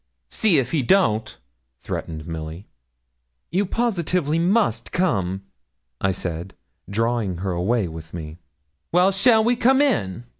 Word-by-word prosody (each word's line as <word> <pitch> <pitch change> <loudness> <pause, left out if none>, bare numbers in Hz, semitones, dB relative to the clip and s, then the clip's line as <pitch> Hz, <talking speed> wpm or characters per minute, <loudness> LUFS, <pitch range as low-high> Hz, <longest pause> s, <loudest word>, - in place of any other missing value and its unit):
'See 205 -8 +3
if 130 - 0
he 155 - +1
don't,' 115 - +2 0.4
threatened 80 +3 -5
Milly. 80 +3 -6 0.9
'You 195 +3 +1
positively 180 -8 0
must 200 +6 +1
come,' 95 - 0 0.6
I 95 - +2
said, 90 0 -5 0.3
drawing 115 -3 0
her 95 - 0
away 95 +4 0
with 80 0 -9
me. 80 -1 -7 0.5
'Well, 180 +3 +4
shall 220 +3 +4
we 240 +2 +3
come 260 +3 +4
in?' 120 - +1
120 Hz, 125 wpm, -23 LUFS, -, 0.9 s, Well